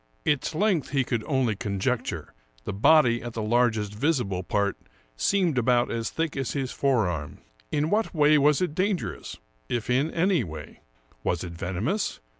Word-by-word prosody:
Its 150 +1 0
length 185 -4 +1
he 135 -1 +1
could 120 -3 -2
only 130 -6 +1
conjecture; 100 - -2 0.3
the - - -4
body 120 +1 +4
at 120 -1 -6
the 115 - -3
largest 110 -2 +1
visible 115 - 0
part 100 +2 0 0.4
seemed 175 - +1
about 120 0 +2
as 115 -1 -2
thick 160 -2 -2
as 135 -2 -2
his 135 -3 -2
fore 130 -8 +1
arm. 75 -4 -4 0.3
In 150 +2 0
what 215 +2 +1
way 150 -2 +4
was 150 +4 +3
it 175 - -2
dangerous, 185 +2 -2 0.3
if 120 0 -2
in 135 +5 +2
any 170 -3 +2
way? 80 -5 -9 0.4
Was 85 0 -1
it 90 - -6
venomous? 95 - -2
125 Hz, 165 wpm, -26 LUFS, 105-150 Hz, 0.4 s, body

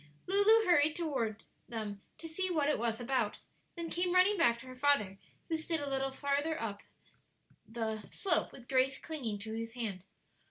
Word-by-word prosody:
Lulu 415 +4 +5
hurried 310 -4 +4
toward 250 -10 -2 0.3
them 215 -4 -5 0.2
to 330 - -8
see 370 +4 -1
what 310 -5 +1
it 300 - +1
was 230 -1 -1
about, 245 -3 0 0.4
then 335 -1 -5
came 355 +1 0
running 370 +3 +6
back 235 -10 +3
to 235 - -11
her 255 0 -9
father, 250 -8 +2 0.3
who 325 - 0
stood 320 +1 -1
a 285 - -4
little 270 0 0
farther 285 +3 -1
up 205 -3 -4 0.9
the 220 -1 -3
slope, 370 -5 +1
with 245 -2 -13
Grace 265 0 +2
clinging 255 -10 -4
to 220 +2 -7
his 225 0 -4
hand. 220 -7 -4
270 Hz, 175 wpm, -33 LUFS, 225-325 Hz, 0.9 s, running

